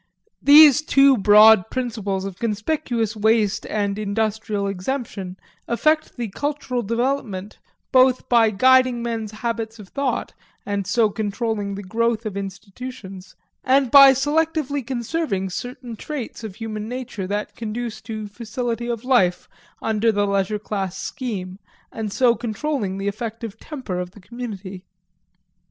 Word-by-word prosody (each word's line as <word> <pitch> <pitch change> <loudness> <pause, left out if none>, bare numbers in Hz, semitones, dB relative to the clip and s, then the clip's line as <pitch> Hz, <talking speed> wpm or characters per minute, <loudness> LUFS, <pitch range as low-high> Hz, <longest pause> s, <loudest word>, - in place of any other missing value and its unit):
These 295 0 +8
two 275 -2 +5
broad 215 -1 +6
principles 215 -7 -3
of 195 -1 -7
conspicuous 230 0 -1
waste 220 -1 +1
and 205 -1 -1
industrial 215 0 -1
exemption 195 -2 -4 0.3
affect 310 +7 +1
the 235 -3 -3
cultural 280 +1 -3
development 230 -3 -2 0.3
both 255 0 +4
by 230 -2 +5
guiding 255 +2 +4
men's 225 -2 -3
habits 225 0 -4
of 205 -4 -12
thought, 280 -2 -2 0.3
and 200 -2 -2
so 215 0 +2
controlling 210 -1 -2
the 200 - -7
growth 230 +3 -1
of 210 -3 -4
institutions, 195 0 -8 0.3
and 265 -1 +3
by 275 -1 +9
selectively 295 +1 0
conserving 235 - -2
certain 245 +3 -6
traits 260 -2 -6
of 210 -4 -7
human 215 -1 -5
nature 245 -6 -5
that 205 +2 -3
conduce 230 0 -5
to 215 -1 -6
facility 235 +2 -4
of 235 -1 -3
life 190 -9 +2 0.4
under 225 +1 +2
the 205 -1 +1
leisure 200 +1 0
class 195 -3 -4
scheme, 195 -6 -5 0.3
and 220 -2 -4
so 245 +2 +4
controlling 220 -2 -3
the 195 +1 -3
effective 225 0 -5
temper 255 - -5
of 180 0 -4
the - - -14
community. 200 -4 -8
225 Hz, 135 wpm, -22 LUFS, 200-250 Hz, 0.4 s, by